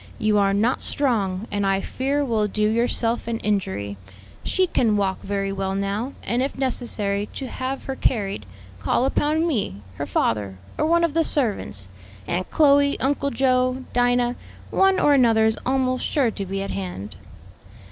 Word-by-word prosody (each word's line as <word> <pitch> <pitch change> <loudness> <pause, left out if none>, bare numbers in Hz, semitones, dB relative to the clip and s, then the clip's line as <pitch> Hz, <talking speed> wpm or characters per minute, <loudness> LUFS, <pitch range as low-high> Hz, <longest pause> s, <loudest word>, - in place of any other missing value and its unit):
You 215 -1 +2
are 200 -1 +3
not 215 +6 +1
strong, 220 -7 0
and 205 0 -1
I 195 0 +2
fear 275 +7 -1
will 220 -4 +1
do 210 +1 0
yourself 230 +1 0
an 230 -1 -1
injury. 100 - -2 0.5
She 375 - +2
can 230 - +2
walk 195 -2 0
very 195 0 -2
well 195 0 -2
now, 200 +7 -2
and 240 +1 0
if 270 - -2
necessary 215 -6 -1
to 270 - -4
have 260 +2 -4
her 270 - -4
carried, 195 - -1 0.3
call 100 - +1
upon 305 +4 +1
me, 200 - -2
her - - -3
father, 100 -4 0 0.2
or 305 - 0
one 340 +1 +3
of 335 -3 +1
the 330 +1 +3
servants; 210 - -1 0.4
Aunt 180 +1 -2
Chloe, 285 -2 +4
Uncle 280 +1 0
Joe, 255 0 +1
Dinah, 245 0 +2 0.3
one 385 0 +4
or 290 - +4
another 230 -5 +4
is 220 0 +1
almost 255 -1 +1
sure 265 -6 +1
to 200 -2 -5
be 195 +1 -2
at 195 - -5
hand." 95 +1 -5
230 Hz, 165 wpm, -23 LUFS, 195-265 Hz, 0.5 s, Chloe